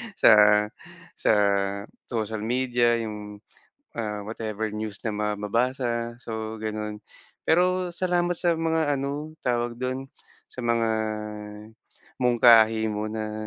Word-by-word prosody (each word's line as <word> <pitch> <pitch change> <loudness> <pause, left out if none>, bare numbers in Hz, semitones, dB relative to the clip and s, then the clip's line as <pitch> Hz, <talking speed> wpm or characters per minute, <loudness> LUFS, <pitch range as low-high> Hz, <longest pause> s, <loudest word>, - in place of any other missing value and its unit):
sa - - +6 0.8
sa - - +1 0.8
social 110 -2 -2
media, 120 +1 +1
'yung, 105 -1 -7 0.5
ah, 105 -3 -4
whatever 110 -1 -4
news 105 -1 -4
na 110 - -1
ma 105 0 -1
mabasa 120 +2 -1
so 110 -1 -5
gano'n. 105 -1 -4 0.5
Pero 180 +1 +2
salamat 175 0 +1
sa 170 -1 +1
mga 160 -3 +1
ano 145 +3 -4
tawag 120 -1 0
do'n, 130 +2 -4 0.4
sa 125 - -8
mga 115 -1 +2 1.3
mungkahi 115 -3 +5
mo 105 0 -3
na 110 0 -4
115 Hz, 110 wpm, -25 LUFS, 110-130 Hz, 1.3 s, sa